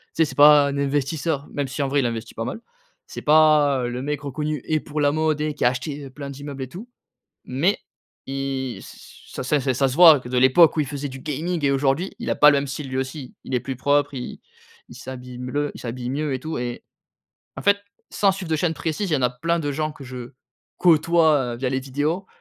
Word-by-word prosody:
Tu 165 - +4
sais, 155 - -2
c'est - - -9
pas 145 0 +7
un 140 - -3
investisseur, 145 +1 -1
même 145 -1 -2
si 135 +2 -3
en - - 0
vrai 140 +1 +1
il 135 - +1
investit 115 -1 -5
pas 115 - -4
mal. 125 - -5 0.5
C'est - - -8
pas, 150 -3 +4
heu, - - -2
le 125 +1 -4
mec 145 +1 -3
reconnu 150 +1 -3
et 155 -1 +1
pour 150 0 -6
la 145 -1 +3
mode 155 0 0
et 155 0 -1
qui 145 - -4
a 120 - +6
acheté 140 +2 -5
plein 140 +1 -8
d'immeubles 140 0 -7
et - - -6
tout, 205 - -10 0.6
mais 150 +11 0 0.5
il 135 -2 -3
ç - - -15
ça - - -4
ça 145 +3 +1
c'est 130 -1 0
ça 135 +2 +2
se 130 - -4
voit 160 -3 +8
que 120 - -10
de 125 - +1
l'époque 130 +6 +6
où - - +2
il 150 - 0
faisait 145 +1 -5
du 135 0 -9
gaming 155 +4 -3
et - - +3
aujourd'hui, 140 +6 0
il 235 - -4
a - - +2
pas 150 - +6
le 145 - +3
même 140 - -2
style, 140 +1 -6
lui 130 - -4
aussi. 130 0 -5
Il - - -5
est 125 - +2
plus 135 +1 -5
propre, 145 +2 +1
il 125 -2 -6 0.5
il - - -12
s'habille 125 -1 -9
mieux 140 +4 -2
il - - -10
s'habille 120 0 -5
mieux 145 +1 -2
et 130 - -3
tout 155 +3 -5
et 120 0 -4 0.7
en - - -6
fait, 200 0 +4 0.3
sans 195 -2 +2
suivre 190 -3 -7
de 160 - +2
chaîne 165 +1 0
précise, 165 +6 -3
il - - +2
y - - +4
en 135 - -2
a 125 - +3
plein 165 +7 -1
de 145 -2 -2
gens 155 +2 -2
que 145 - -13
je 125 -1 -8 0.5
côtoie, 160 -6 +3
heu, - - -7
via 130 +2 -2
les 130 +1 0
vidéos 145 +8 -2
145 Hz, 250 wpm, -23 LUFS, 130-155 Hz, 0.7 s, voit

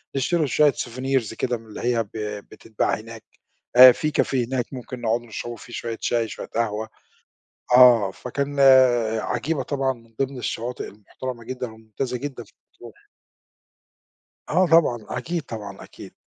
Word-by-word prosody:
نشتروا 155 +4 +1
شويّة 150 +1 +4
souvenirs 130 -2 -2
كده 120 +1 -2
من 115 - -17
اللي 105 - -9
هي 120 -1 +1
ب 100 - -22 0.4
بتتباع 110 - -2
هناك، 115 0 -11 0.5
آآ 130 0 +11
في 155 +4 -2
café 135 - -2
هناك 130 -2 -1
ممكن 125 -1 -8
نقعدوا 120 +1 -1
نشربوا 120 +2 -6
فيه 120 - -13
شويّة 115 -1 -4
شاي 115 -2 0
شويّة - - -8
قهوة، 110 -1 -2 0.9
آه، 120 -6 +7
فكان 140 +6 -4
آآ 125 -5 +5
عجيبة 135 +5 -2
طبعًا 135 -1 -1
من 115 -2 -18
ضمن 135 -1 -4
الشواطئ 120 +1 -4
المُحترمة 115 +4 -8
جدًا، 125 -2 -5
وممتازة 110 +3 -5
جدًا 130 -2 -6
في - - -24 0.2
مطروح. - - -15 1.4
آه 185 +1 +3
طبعًا، 165 -7 +4
أكيد 170 -1 -3
طبعًا، 105 -5 -8
أكيد. - - -13
120 Hz, 150 wpm, -23 LUFS, 115-135 Hz, 1.4 s, آآ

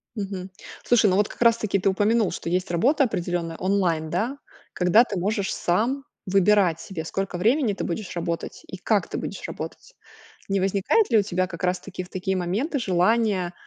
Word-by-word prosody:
Мгм. 195 -3 -5 0.3
Слушай, 230 -4 +4
ну 185 - +2
вот 205 +1 +2
как - - -13
раз 235 -1 +5
таки 200 -3 0
ты 195 - +2
упомянул, 210 +2 +2
что - - -5
есть 180 +2 -1
работа 265 - +3
определённая 175 -6 -3
онлайн, 180 -5 0
да, 220 - -1 0.4
когда 180 +6 +5
ты 205 -6 -4
можешь 200 +2 -1
сам 235 +11 0 0.2
выбирать 195 -3 +3
себе 170 -3 -6
сколько 195 +2 -3
времени 230 - +2
ты - - -4
будешь 185 +2 -4
работать 170 -1 -4
и - - -8
как - - +1
ты - - -5
будешь - - -5
работать. - - -8 0.5
Не 195 0 +1
возникает 195 - +2
ли 230 - +4
у - - +5
тебя 185 -2 -1
как 170 -1 -9
раз 180 0 +1
таки 185 -2 -7
в 180 - -14
такие 190 +1 -2
моменты 205 - -1
желание 190 -2 +1
195 Hz, 190 wpm, -24 LUFS, 180-220 Hz, 0.5 s, раз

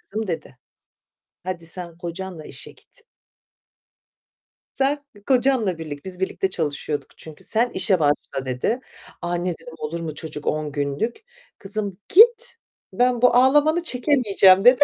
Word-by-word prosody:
"Kızım," 215 +1 -5
dedi, 160 -7 -5 0.9
"hadi 180 -3 -5
sen 170 0 -3
kocanla 175 -2 -6
işe - - -6
git." 485 - -16 1.7
Sen 280 +2 0 0.2
kocanla 250 -8 +2
birlikte 150 -3 -7
Biz 180 0 -6
birlikte 190 0 -1
çalışıyorduk 150 -3 -3
çünkü. 155 -2 -10
Sen 235 +2 +3
işe 190 -5 +1
başla 145 -2 0
dedi. 130 - -1 0.4
"Anne" 175 +1 -2
dedim, 165 0 -12
"olur 165 +2 -4
mu 155 -2 -5
çocuk 150 -2 -7
10 155 -1 -1
günlük." 145 - -3 0.3
"Kızım 200 -1 -2
git, 470 +4 +6 0.4
ben 245 -1 +2
bu 245 -1 +5
ağlamanı" 295 +6 +4
"Çekemeyeceğim." 235 - +4
dedi. 250 +3 +7
190 Hz, 130 wpm, -22 LUFS, 160-250 Hz, 1.7 s, dedi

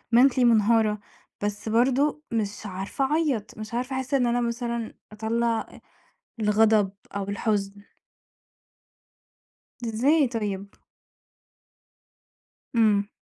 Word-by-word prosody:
mentally 260 +1 +5
منهارة، 220 -2 +4 0.4
بس 205 +1 -3
برضه 265 +6 +2
مش 210 -2 -2
عارفة 195 +7 -2
أعيّط، 285 -11 0
مش 215 +1 -8
عارفة 255 +2 -2
أحس 260 +2 -4
إن 255 -3 +3
أنا 240 +1 +1
مثلًا 235 -1 -3 0.2
أطلّع 225 +2 0
أ - - -13 0.6
الغضب 210 -1 +3 0.2
أو 200 - -1
الحُزن. 200 -1 -1 2.1
إزاي 265 +7 +3
طيب؟ 205 -4 -3 2.1
إمم. 210 -3 +3
225 Hz, 95 wpm, -26 LUFS, 210-245 Hz, 2.1 s, mentally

